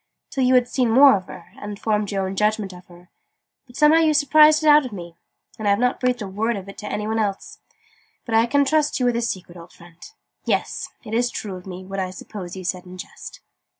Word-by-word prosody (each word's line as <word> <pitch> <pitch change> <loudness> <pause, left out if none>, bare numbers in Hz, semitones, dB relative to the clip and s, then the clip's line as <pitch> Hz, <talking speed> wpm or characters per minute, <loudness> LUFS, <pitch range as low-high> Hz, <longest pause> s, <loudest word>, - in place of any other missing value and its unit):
"till 265 - -1
you 255 0 +4
had 250 -1 +4
seen 250 -2 0
more 270 +3 +7
of 190 -2 -4
her, 170 +3 -12
and 205 0 -7
formed 210 -2 -1
your 195 -1 -1
own 190 +1 -4
judgment 210 -1 0
of 180 0 -14
her: 175 0 -18 0.6
but 245 - -17
somehow 300 +3 +5
you 315 -2 +3
surprised 305 +2 +5
it - - +1
out 300 0 +7
of 255 - -7
me. 175 -4 -9 0.4
And 215 - -2
I've 200 0 +3
not 250 +3 0
breathed 250 -3 0
a - - -5
word 215 +4 -2
of 195 0 -8
it 195 - -11
to 210 - -7
any 210 0 -3
one 220 +1 -1
else. 200 -3 -3 0.7
But 230 - -5
I 225 +1 +4
can 285 +3 +2
trust 305 0 +1
you 250 - +1
with 245 -1 +1
a 235 - 0
secret, 185 -6 -5
old 170 +1 -14
friend! 170 -1 -18 0.4
Yes! - - -2
It's 235 +2 -1
true 200 -5 -6
of 180 +1 -11
me, 185 0 -8
what 195 +1 -5
I 185 -1 -2
suppose 185 -1 -9
you 190 - -8
said 180 0 -4
in 180 +1 -11
jest. - - -10
210 Hz, 245 wpm, -22 LUFS, 185-250 Hz, 0.7 s, more